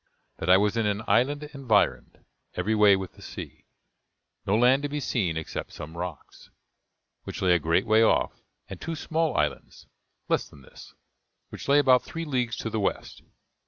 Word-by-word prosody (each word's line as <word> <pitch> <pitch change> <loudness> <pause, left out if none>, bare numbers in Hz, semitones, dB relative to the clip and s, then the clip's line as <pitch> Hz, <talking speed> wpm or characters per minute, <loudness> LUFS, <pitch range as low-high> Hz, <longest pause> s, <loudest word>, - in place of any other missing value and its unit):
that 85 - -3
I 95 - +8
was 105 +2 +1
in 110 -2 +1
an 105 +1 -1
island 130 +8 +2
environed 125 -7 0 0.3
every 110 - 0
way 105 -2 +6
with 95 -1 -5
the - - -17
sea: - - -9 0.8
no 100 +2 +3
land 125 +4 +4
to 145 - -3
be 150 +1 -3
seen 95 - -1
except 80 - -6
some 80 +2 -9
rocks, 85 -2 -8 0.8
which - - -6
lay 90 -1 +4
a 85 - +3
great 80 +4 +1
way 110 +1 +4
off; 115 - +2 0.3
and - - -9
two 165 0 -4
small 160 0 -1
islands, 75 -1 -2 0.4
less - - 0
than 70 - -17
this, - - -15 0.5
which - - -9
lay 140 +1 +5
about 130 -3 +5
three 165 0 -6
leagues 125 -5 -1
to 115 - -5
the 110 - -1
west. 100 - -3
110 Hz, 180 wpm, -26 LUFS, 95-135 Hz, 0.8 s, I